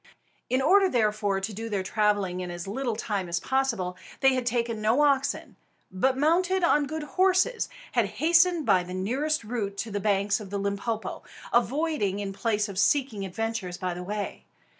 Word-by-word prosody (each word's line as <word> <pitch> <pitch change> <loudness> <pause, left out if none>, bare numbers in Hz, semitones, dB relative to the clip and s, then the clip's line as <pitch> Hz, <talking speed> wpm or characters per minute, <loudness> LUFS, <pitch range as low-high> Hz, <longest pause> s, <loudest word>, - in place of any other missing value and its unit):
In 255 +1 +1
order, 385 +5 +5
therefore, 210 - +1
to 195 +3 -4
do 225 +3 -5
their 200 -3 -1
travelling 205 -2 0
in 180 -1 -4
as 175 +1 -6
little 235 +3 -2
time 205 -5 -3
as 170 0 0
possible, 230 -7 -1 0.3
they 270 -1 +5
had 255 -2 -1
taken 235 -2 -1
no 225 +6 +3
oxen; 275 -2 0 0.3
but, 260 +8 +1
mounted 355 +5 +2
on 295 -4 +3
good 315 +1 -4
horses, 375 +8 +2 0.2
had - - +2
hastened 335 0 +4
by 185 - +4
the 180 +1 -7
nearest 265 +10 -1
route 210 -3 -3
to 220 +2 -4
the 205 - -2
banks 200 0 +1
of 205 -3 -9
the 200 - -3
Limpopo, 200 +3 -3 0.3
avoiding 255 - +1
in 200 -1 -4
place 210 0 0
of 195 -2 -4
seeking 255 -5 +2
adventures 200 -2 -3
by 185 -1 -2
the 175 - -6
way. 205 +3 -4
220 Hz, 180 wpm, -27 LUFS, 200-275 Hz, 0.3 s, order